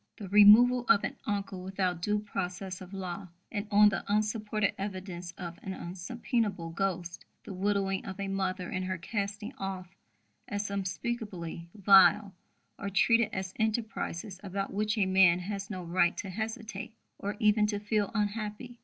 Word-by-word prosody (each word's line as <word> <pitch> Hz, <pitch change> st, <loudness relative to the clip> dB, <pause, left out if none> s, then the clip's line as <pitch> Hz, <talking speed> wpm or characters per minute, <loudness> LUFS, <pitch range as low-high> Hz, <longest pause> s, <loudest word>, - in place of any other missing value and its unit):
The 205 Hz, -4 st, -7 dB
'removal' 230 Hz, +5 st, +7 dB
of 200 Hz, -, +5 dB
an -, -, -3 dB
uncle 200 Hz, -3 st, -3 dB
without 185 Hz, -2 st, -1 dB
due 210 Hz, +4 st, +1 dB
process 190 Hz, -2 st, -4 dB
of 185 Hz, 0 st, -10 dB
law 190 Hz, -1 st, -5 dB, 0.2 s
and 205 Hz, 0 st, -3 dB
on 210 Hz, 0 st, +7 dB
the 195 Hz, -, -3 dB
unsupported 215 Hz, 0 st, 0 dB
evidence 185 Hz, -3 st, -5 dB
of 175 Hz, -2 st, -7 dB
an 190 Hz, -1 st, -5 dB
unsubpoenable 195 Hz, 0 st, -3 dB
ghost; 180 Hz, 0 st, -3 dB, 0.2 s
the 200 Hz, -, -7 dB
widowing 195 Hz, 0 st, 0 dB
of 195 Hz, 0 st, -7 dB
a 200 Hz, -, -2 dB
mother 190 Hz, -1 st, -2 dB
and 185 Hz, 0 st, -3 dB
her 185 Hz, 0 st, -2 dB
casting 205 Hz, -, -4 dB
off 190 Hz, -1 st, -5 dB, 0.5 s
as 205 Hz, 0 st, -3 dB
unspeakably 190 Hz, -3 st, -4 dB
vile, 195 Hz, 0 st, +6 dB, 0.5 s
are 200 Hz, -, -3 dB
treated 230 Hz, +3 st, +4 dB
as 190 Hz, -1 st, -4 dB
enterprises 215 Hz, -4 st, -2 dB
about 195 Hz, 0 st, -4 dB
which 210 Hz, +2 st, 0 dB
a 205 Hz, -, +3 dB
man 190 Hz, -2 st, +5 dB
has 195 Hz, +2 st, -5 dB
no 185 Hz, -3 st, -5 dB
right 175 Hz, +1 st, +2 dB
to 195 Hz, -, -5 dB
hesitate 220 Hz, 0 st, -5 dB, 0.2 s
or 205 Hz, +1 st, -3 dB
even 210 Hz, 0 st, +4 dB
to 205 Hz, -1 st, -2 dB
feel 210 Hz, -1 st, 0 dB
unhappy." 215 Hz, +3 st, -3 dB
200 Hz, 155 wpm, -30 LUFS, 185-210 Hz, 0.5 s, removal